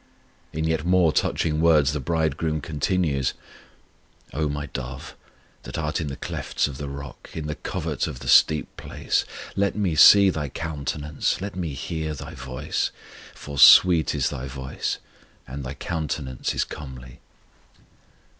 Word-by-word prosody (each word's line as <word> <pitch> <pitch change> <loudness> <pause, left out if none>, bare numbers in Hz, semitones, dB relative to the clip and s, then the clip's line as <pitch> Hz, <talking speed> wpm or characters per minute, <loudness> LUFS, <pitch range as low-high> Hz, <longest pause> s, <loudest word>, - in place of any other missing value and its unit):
In 80 - -3
yet 80 -1 0
more 90 -2 +3
touching 75 +2 0
words 75 -4 +4
the 75 - -2
Bridegroom 80 +1 -1
continues: 75 -2 -1 1.0
O 75 +1 0
My 75 0 -3
dove, 65 -2 -7 0.5
that - - -7
art 80 +1 -1
in 80 - -3
the 70 - -4
clefts - - -2
of 70 -2 -8
the 70 -1 -4
rock, 70 -2 -9
in 80 - -4
the 75 - -3
covert - - -3
of - - -6
the 65 0 -9
steep 75 +4 +5
place, - - -1 0.3
Let 100 0 +1
Me 100 -5 0
see 100 +5 +8
thy 75 -4 -3
countenance, 75 0 -3
let 100 +1 -5
Me 85 -6 -3
hear 80 +2 -4
thy 70 +3 -8
voice: 65 -3 -3 0.5
For 70 -1 -7
sweet 85 -2 +7
is - - 0
thy 65 -2 -5
voice, 65 0 -4 0.5
and 70 +2 -6
thy 65 +2 -6
countenance 75 -5 -3
is - - +2
comely. 65 -4 -10
75 Hz, 150 wpm, -24 LUFS, 70-80 Hz, 1.0 s, see